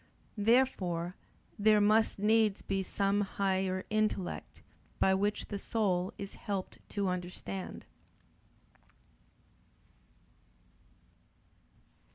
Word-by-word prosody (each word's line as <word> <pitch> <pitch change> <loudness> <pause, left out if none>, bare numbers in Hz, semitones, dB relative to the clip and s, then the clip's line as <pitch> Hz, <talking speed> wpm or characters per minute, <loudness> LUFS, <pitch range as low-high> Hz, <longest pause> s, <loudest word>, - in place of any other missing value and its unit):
Therefore 195 -7 +2 0.4
there 215 0 +5
must 215 +2 +3
needs 215 0 +3
be 195 -1 -1
some 200 +2 +1
higher 190 -1 0
intellect, 215 -4 -1 0.4
by 190 - +4
which 205 +2 0
the 205 - -3
soul 190 -5 0
is 200 -1 -7
helped 200 -4 -4
to 200 -1 -1
understand. 180 +1 -5
200 Hz, 80 wpm, -32 LUFS, 185-210 Hz, 0.4 s, there